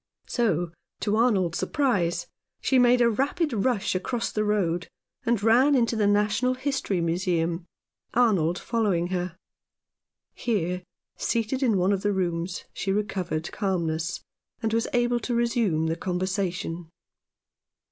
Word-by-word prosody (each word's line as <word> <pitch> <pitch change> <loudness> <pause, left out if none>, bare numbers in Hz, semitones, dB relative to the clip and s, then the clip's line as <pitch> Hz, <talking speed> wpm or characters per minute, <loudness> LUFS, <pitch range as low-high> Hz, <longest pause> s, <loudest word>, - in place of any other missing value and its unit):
So, 175 -8 0 0.3
to 210 0 +1
Arnold's 200 -7 +2
surprise, 195 - +1 0.3
she 265 - +3
made 245 0 +5
a 235 - +5
rapid 285 +6 0
rush 220 0 +1
across 230 +6 -2
the 215 - 0
road, 180 -5 0 0.4
and 230 -3 +2
ran 250 +6 +5
into 235 -2 +2
the 210 -2 +2
Natural 210 +5 +2
History 265 -7 -1
Museum, 170 0 0 0.5
Arnold 190 -9 +3
following 200 -8 0
her. 180 -2 -2 1.0
Here, 180 -6 -1 0.4
seated 235 +3 -1
in 230 -7 +3
one 185 +2 +3
of 195 - -1
the 205 0 +1
rooms, 175 -1 -2
she 195 - -2
recovered 190 -5 -2
calmness, 170 -5 -1 0.4
and 220 0 0
was 230 0 +1
able 240 0 +2
to 240 +1 -2
resume 230 -9 +1
the 160 0 0
conver 180 0 -3
sation. 180 -3 -3
205 Hz, 135 wpm, -26 LUFS, 175-235 Hz, 1.0 s, made